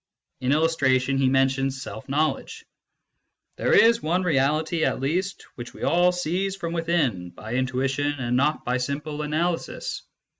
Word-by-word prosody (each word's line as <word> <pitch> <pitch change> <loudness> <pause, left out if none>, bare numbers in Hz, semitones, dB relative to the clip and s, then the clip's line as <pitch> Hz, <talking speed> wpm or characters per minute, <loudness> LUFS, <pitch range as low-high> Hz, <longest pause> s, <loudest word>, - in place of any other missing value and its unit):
In 130 +1 0
illustration, 140 -4 +2
he 135 -1 +3
mentions 135 0 +1
self 110 +5 -9
knowledge: 155 +3 -1 0.4
" - - -53
there - - 0
is 230 +1 +6
one 175 +4 0
reality, 155 +1 +1
at - - +1
least, 180 +8 -2
which 120 -1 -9
we - - -9
all 175 +4 +4
seize 180 +2 -1
from 170 -4 -4
within, 155 - 0
by 110 +6 -8
intuition 130 +3 0
and 125 -4 -2
not 140 +4 +1
by 125 +1 +1
simple 145 +4 -3
analysis. 165 +3 -2
145 Hz, 150 wpm, -24 LUFS, 130-165 Hz, 0.4 s, is